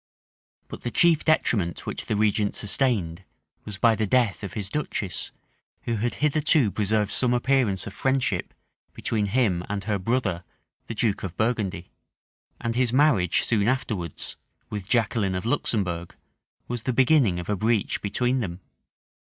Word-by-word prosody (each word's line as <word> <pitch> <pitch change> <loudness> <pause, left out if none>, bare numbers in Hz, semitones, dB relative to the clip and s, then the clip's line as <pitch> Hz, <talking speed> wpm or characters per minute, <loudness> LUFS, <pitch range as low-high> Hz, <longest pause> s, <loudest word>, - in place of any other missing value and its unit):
But - - -9
the 120 - -3
chief 165 +4 +3
detriment 105 - +1
which - - -5
the 110 - 0
regent 105 -1 +1
sustained, 100 -6 0 0.4
was 105 -2 -7
by 115 +2 +4
the 110 -1 -1
death 115 -6 +2
of 100 - -5
his 105 -3 -2
duchess, 100 - -3 0.5
who 115 -1 -1
had 120 +3 -1
hitherto 150 -5 +3
preserved 105 +1 +1
some 125 -1 +3
appearance 120 -6 +1
of 100 - -7
friendship 130 -8 0 0.4
between 105 -2 -1
him 100 -6 +1
and 100 -1 -3
her 105 -1 -1
brother, 95 -4 -1 0.4
the 115 - -5
duke 105 -2 0
of 95 -3 -6
Burgundy:[] 105 -6 -1 0.7
and 115 -1 -2
his 125 -1 +2
marriage, 125 - +3
soon 105 -3 +1
afterwards, 110 - -2 0.3
with 105 -3 -5
Jaqueline 110 -5 +1
of 90 - -4
Luxembourg, 90 -7 -1 0.5
was 120 -1 -3
the 130 - -1
beginning 130 - +3
of 90 - -6
a 105 - 0
breach 110 +1 0
between 125 +5 0
them. 90 -6 -4
110 Hz, 150 wpm, -25 LUFS, 95-125 Hz, 0.7 s, by